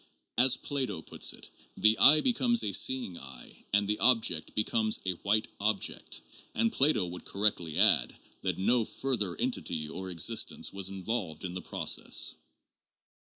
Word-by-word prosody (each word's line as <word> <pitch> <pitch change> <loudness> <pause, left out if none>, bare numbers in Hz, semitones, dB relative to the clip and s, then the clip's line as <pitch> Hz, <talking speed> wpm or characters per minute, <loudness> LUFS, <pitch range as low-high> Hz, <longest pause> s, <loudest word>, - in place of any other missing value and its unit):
As 125 +1 +6
Plato 130 - -4
puts - - -1
it, - - -10 0.3
the 110 +1 +4
eye 150 +2 +7
becomes 240 -1 +2
a 100 - -2
seeing 120 -3 +1
eye - - -12
and 100 0 +1
the 105 +1 -2
object 110 -10 +2
becomes 110 0 +1
a 95 - 0
white 105 +2 0
object; 105 0 -2 0.3
and 230 0 0
Plato 135 -8 +2
would 90 0 -9
cor 100 - -7
rectly 85 -7 0
add - - +3 0.2
that - - -3
no 120 +5 +1
further 105 -8 -3
entity 80 -3 -2
or 95 +4 -7
existence 85 -4 +1
was 100 -1 +1
involved 95 -4 -5
in 90 - -6
the 90 - -6
process. - - +1
105 Hz, 155 wpm, -28 LUFS, 90-125 Hz, 0.3 s, eye